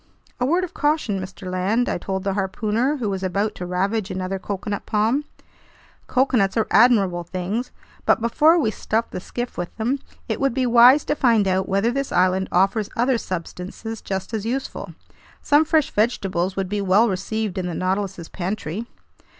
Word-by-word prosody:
"A 250 - +1
word 350 +5 +2
of 360 -1 -5
caution, 295 -10 0
Mr. 185 +1 -9
Land," 190 +7 0
I - - -1
told 190 +1 -3
the 195 -1 0
harpooner, 215 +8 0
who 240 -5 -2
was 195 -2 -2
about 195 +3 -1
to 180 - -6
ravage 195 +3 -1
another 185 0 -3
coconut 205 +1 -4
palm. 225 +7 +1 0.8
"Coconuts 240 -6 +2
are 225 - +3
admirable 200 -6 +4
things, 190 +8 -3 0.4
but - - +4
before 300 +9 +4
we 225 -10 +1
stuff 225 +1 -2
the - - -4
skiff 240 +5 -5
with 175 - -5
them, 245 +5 0 0.3
it - - -2
would 275 -3 +1
be 260 -1 +1
wise 245 +4 +6
to - - +1
find 230 -7 +3
out 190 0 0
whether 200 +4 +2
this 275 +2 -2
island 185 +1 +2
offers 195 +3 +2
other 245 0 +2
substances 185 +5 -6
just 190 +3 -4
as 215 -2 -2
useful. 255 +4 -4 0.5
Some 295 +1 +5
fresh 310 -2 +2
vegetables 195 -5 0
would 195 -1 -1
be 205 +2 -2
well 200 +4 +4
received 200 0 -2
in 180 - -2
the 175 - -4
Nautilus's 190 -2 -2
pantry." 195 +2 -4
210 Hz, 175 wpm, -22 LUFS, 190-240 Hz, 0.8 s, wise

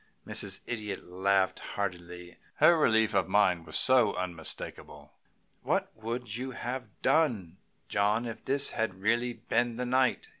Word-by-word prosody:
Mrs. - - -3
Idiot 105 -5 -4
laughed 95 +1 +1
heartily. 90 -3 -5 0.2
Her 170 - +6
relief 110 -8 +3
of 100 - +2
mind 90 -4 +2
was - - +2
unmistakable. 90 -10 -1 0.5
"What - - -1
would 115 0 -4
you 130 +2 -4
have 125 -1 -4
done, 110 - +2 0.3
John, 105 +3 +1
if 115 -2 -7
this 140 +1 0
had 110 -4 -1
really 115 +5 0
been 120 0 -1
the 125 - -2
night?" 130 +1 +2
110 Hz, 135 wpm, -30 LUFS, 95-125 Hz, 0.5 s, Her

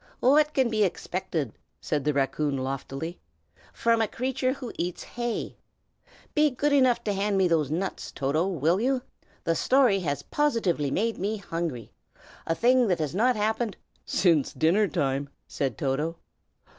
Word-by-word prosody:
"What 300 +4 +4
can 265 -2 +3
be 215 -1 +2
expected," 175 - -2 0.3
said 150 -3 -1
the 150 - +3
raccoon 140 +1 0
loftily, 135 +5 -4 0.5
"from 230 -1 +2
a 220 - +2
creature 255 +2 -1
who 260 -4 -7
eats 175 0 -3
hay? 240 -1 -4 0.8
Be 300 -1 +4
good 285 +3 0
enough 255 -4 +4
to 210 - 0
hand 200 +1 0
me 190 -1 +4
those 160 -5 +1
nuts, 180 +5 -3
Toto, 150 +6 0
will 175 +1 +1
you? 255 +1 +1 0.4
The 165 - +1
story 250 - +3
has 145 -5 -2
positively 220 - 0
made 225 +9 -1
me 205 +4 -1
hungry, 165 - -4 0.6
a 165 - +1
thing 245 +4 +4
that 180 -3 +2
has 155 -2 -2
not 245 +6 +3
happened 220 0 -1 0.2
" - - -37
"Since 170 -6 +2
dinner 185 +7 +3
time!" 140 -5 -1 0.2
said 135 -6 -2
Toto. 150 +4 -1
190 Hz, 155 wpm, -27 LUFS, 150-235 Hz, 0.8 s, What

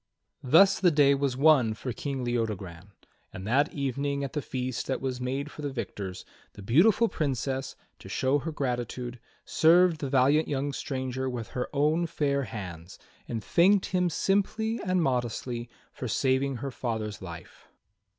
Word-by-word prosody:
Thus 190 +9 +5
the 185 - +5
day 145 -3 +5
was 140 -2 -1
won 135 -7 +4
for 125 +2 -5
King 135 +2 -4
Leodogran; 100 -7 -3 0.4
and 95 - -8
that 140 +8 +2
evening 140 0 -2
at 140 - -5
the 150 - -1
feast 125 -2 -4
that 135 - -1
was 130 -2 -3
made 135 +4 -3
for - - -9
the 145 - -2
victors, 100 -7 -6 0.3
the 100 - -11
beautiful 190 - +4
Princess, 135 - -2 0.2
to - - -11
show 135 +2 +1
her 160 +3 -4
gratitude, 125 -3 -3 0.3
served 170 0 +4
the 140 - -2
valiant 140 +4 +3
young 140 0 -2
stranger 130 -1 -3
with 120 -3 -5
her 125 - -3
own 155 +4 +1
fair 140 -4 0
hands, 90 -6 -8 0.3
and 115 -2 -4
thanked 190 +3 +4
him 180 -2 +1
simply 220 +6 0
and 185 -3 +1
modestly 120 -2 -2 0.2
for 125 - -5
saving 130 +3 +1
her 135 +3 -5
father's 110 -4 -4
life. 85 -3 -10
135 Hz, 160 wpm, -28 LUFS, 120-150 Hz, 0.4 s, Thus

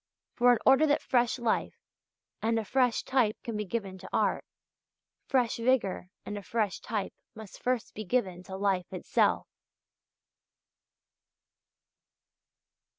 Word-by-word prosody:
For, 245 0 +5
in - - +2
order 270 +4 +6
that 290 - +2
fresh 240 -2 +2
life 235 -3 -1 0.6
and 230 +1 +1
a 225 - -1
fresh 250 0 +2
type 245 -5 +1
can 230 - -4
be 210 0 -2
given 195 -2 -4
to 190 - -10
art, - - +1 0.8
fresh 250 -4 +1
vigour 230 -7 +1 0.2
and 205 0 -4
a - - -10
fresh 210 -1 -1
type 210 -4 -3 0.2
must 220 -3 -11
first 250 -2 -1
be 215 - -5
given 190 -4 -1
to 190 - -6
life 195 -3 0
itself. 185 - +1
225 Hz, 130 wpm, -29 LUFS, 195-245 Hz, 0.8 s, order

